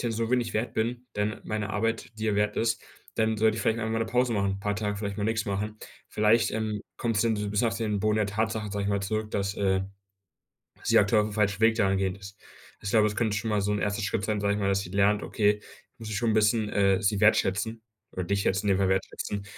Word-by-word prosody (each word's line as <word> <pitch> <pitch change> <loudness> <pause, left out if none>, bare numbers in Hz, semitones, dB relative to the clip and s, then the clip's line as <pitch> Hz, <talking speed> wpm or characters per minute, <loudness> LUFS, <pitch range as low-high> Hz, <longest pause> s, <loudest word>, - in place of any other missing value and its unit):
so 115 0 -1
wenig 120 -2 +1
wert 110 +3 -1
bin, 120 +3 -2
dann 105 +1 -2
meine 105 -2 -3
Arbeit 115 +4 -1
dir 110 -1 0
wert 105 0 +1
ist, 115 +1 0 0.3
dann 110 -1 +1
sollte 110 0 +3
ich - - -3
vielleicht 115 +1 +1
einfach 110 0 -2
mal 115 - 0
'ne 115 - 0
Pause 125 0 +1
machen, 100 -2 0
paar 105 +1 -1
Tage 105 -1 -2
vielleicht 100 -1 -4
mal 100 - -2
nix 110 0 0
machen.“ 105 +2 -3 0.3
Vielleicht, 110 +2 +3
ähm, 110 -1 -2 0.2
kommt's 115 -4 0
denn 115 -1 +2
so 105 -1 -3
bisschen 105 +3 +1
auf 115 - -2
den 105 -3 -1
Boden 110 +1 +1
der 105 - +2
Tatsache, 110 +1 -2
sage 100 0 -2
ich 100 - -1
mal 100 -1 0
zurück, 110 +2 -2
dass, 100 0 -1
äh, 95 -1 +1 1.0
sie - - +4
aktuell 105 +2 +4
aufm 105 0 -4
falschen 100 -1 0
Weg 115 0 +5
dahin 95 -3 +2
gehend 95 0 -1
ist. 100 +1 -11 0.5
Ich 100 - -3
glaube, 110 -1 +4
es 105 - -2
könnte 110 -3 0
schon 110 +2 -2
mal 105 -1 +2
so 105 - 0
ein 105 - 0
1. 105 +1 -1
Schritt 100 0 -1
sein, 105 -1 -1
sage 100 0 +1
ich - - -2
mal, 100 - +1
dass 100 0 +2
sie 90 - -7
lernt: 100 +2 +2
„Okay, 105 -1 +1 0.4
muss 115 -2 -8
ich 110 - -3
schon 115 +1 +1
bisschen, 110 0 +3
äh, 100 -2 +2
sie 100 0 +1
wertschätzen, 110 +1 +2 0.3
oder 95 - -3
dich 100 +1 0
schätzen 95 +2 0
in 95 - +4
dem - - 0
Fall 95 -1 +2
wertschätzen, 95 +1 -2
105 Hz, 250 wpm, -27 LUFS, 100-110 Hz, 1.0 s, Weg